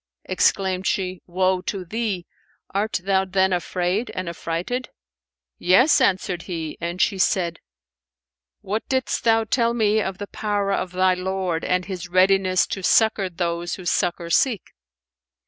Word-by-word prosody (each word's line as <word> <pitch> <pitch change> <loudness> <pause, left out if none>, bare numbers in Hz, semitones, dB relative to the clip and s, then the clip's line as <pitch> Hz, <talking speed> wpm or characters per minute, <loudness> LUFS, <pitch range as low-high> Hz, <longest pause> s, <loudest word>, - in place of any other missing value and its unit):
Exclaimed 190 -2 +1
she, 185 -2 -1
"Woe 185 +1 +1
to 190 -1 -4
thee! 210 -3 -3 0.5
art 205 -1 -1
thou 190 0 +2
then 190 0 +1
afraid 180 +5 -1
and 185 -1 -3
affrighted?" 170 +9 -3 0.7
"Yes," 245 - +5
answered 185 -2 +1
he; 165 -3 -4
and 170 +1 -3
she 195 -1 +1
said, 170 -3 +1 1.0
"What 210 +3 -2
didst 260 -5 0
thou 225 -1 +4
tell 235 +1 +1
me 215 -1 +2
of 190 -2 -3
the 205 - -5
power 205 -1 -2
of 185 -2 -2
thy 185 0 +3
Lord 185 -2 -2
and 180 0 0
His 185 -3 -6
readiness 185 0 +3
to 195 - -5
succour 215 0 +3
those 170 0 -2
who 185 - -11
succour 170 -1 0
seek? 230 -4 +2
185 Hz, 145 wpm, -23 LUFS, 180-205 Hz, 1.0 s, Yes